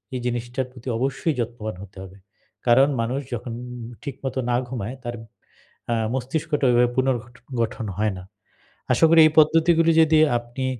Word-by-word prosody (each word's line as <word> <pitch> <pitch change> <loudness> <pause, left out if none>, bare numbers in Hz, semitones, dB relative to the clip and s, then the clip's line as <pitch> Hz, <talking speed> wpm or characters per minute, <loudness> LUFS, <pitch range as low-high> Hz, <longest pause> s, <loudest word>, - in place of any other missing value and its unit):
এই 125 - -2
জিনিসটার 120 +2 -2
প্রতি 125 0 -14
অবশ্যই 135 +5 -1
যত্নবান 110 -3 -4
হতে 100 0 -14
হবে। 95 +1 -12 0.5
কারণ 135 +4 +6
মানুষ 125 +4 -1
যখন 120 0 -5 0.5
ঠিকমত 135 -2 -5
না 120 - +2
ঘুমায়, 120 0 -5
তার 120 0 -4 0.8
আ - - +2 0.2
মস্তিষ্কটা 145 +3 -1
ওইভাবে 120 0 +4
পুনর্গঠ 125 -2 -1 0.3
গঠন 115 0 -2
হয় 105 -1 0
না। 90 - -9 0.7
আশা 165 - +4
করি 165 0 +6
এই 155 - -1
পদ্ধতিগুলি 165 +1 +4
যদি 155 -1 +4 0.2
আপনি 120 +2 -6
125 Hz, 150 wpm, -23 LUFS, 120-140 Hz, 0.8 s, কারণ